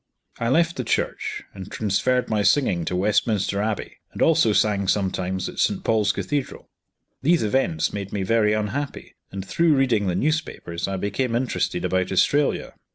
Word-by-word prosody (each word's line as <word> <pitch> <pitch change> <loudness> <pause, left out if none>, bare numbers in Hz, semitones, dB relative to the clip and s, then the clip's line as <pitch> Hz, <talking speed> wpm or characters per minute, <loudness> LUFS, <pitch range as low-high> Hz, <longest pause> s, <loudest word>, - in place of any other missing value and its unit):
I 115 - 0
left 165 +5 +2
the 130 - -2
church, - - -2
and 95 -1 -9
transferred 110 +5 0
my 110 -2 0
singing 100 - +2
to 90 - -2
Westminster 100 +1 +1
Abbey, 110 -1 -3 0.2
and - - -9
also 160 -9 +4
sang 100 -2 +2
sometimes 95 -2 -1
at - - -7
St. - - +1
Paul's 105 -2 +2
Cathedral. 145 +4 -4 0.5
These 165 +2 +3
events 105 -8 0
made 100 -1 -5
me 100 -2 -2
very 105 +1 +2
unhappy; 110 +7 -3 0.2
and, 95 -1 -6
through 165 +3 +3
reading 125 -7 +2
the 90 - 0
newspapers, 130 - -2
I 95 0 -2
became 115 +6 -1
interested 125 +1 -1
about 95 0 0
Australia. 145 +9 +1
105 Hz, 160 wpm, -23 LUFS, 95-130 Hz, 0.5 s, also